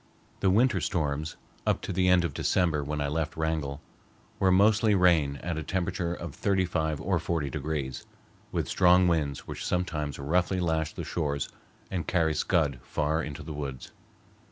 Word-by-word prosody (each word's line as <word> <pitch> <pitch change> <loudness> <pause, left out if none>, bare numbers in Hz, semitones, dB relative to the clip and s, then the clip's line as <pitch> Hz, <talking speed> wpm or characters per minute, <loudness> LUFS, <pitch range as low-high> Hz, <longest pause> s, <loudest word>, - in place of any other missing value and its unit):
The 95 - +3
winter 105 -1 +3
storms, 75 -1 -1 0.3
up - - +1
to - - -4
the 90 +1 +2
end 90 -1 +5
of 75 - -3
December 80 -1 +1
when 75 +1 -3
I 70 - 0
left 80 +2 -2
Wrangell, 80 -3 -2 0.6
were 95 -1 +4
mostly 105 +2 +4
rain 85 -7 +4
at 85 -2 -2
a - - -4
temperature 85 +1 -1
of 85 -4 -7
thirty 95 -2 +1
five 80 -4 -1
or 90 +2 0
forty 80 -4 -2
degrees, 70 -3 -3 0.4
with - - -1
strong 90 0 +5
winds 75 -5 0
which - - -6
sometimes 75 -6 -1
roughly 90 +6 +1
lash 80 -3 0
the - - -6
shores 70 -4 -2 0.4
and 85 -5 -2
carry 80 -3 +2
scud 75 -4 +1
far 75 +4 -1
into 75 -1 -6
the 75 - -6
woods. 70 -3 -6
80 Hz, 170 wpm, -28 LUFS, 75-90 Hz, 0.6 s, end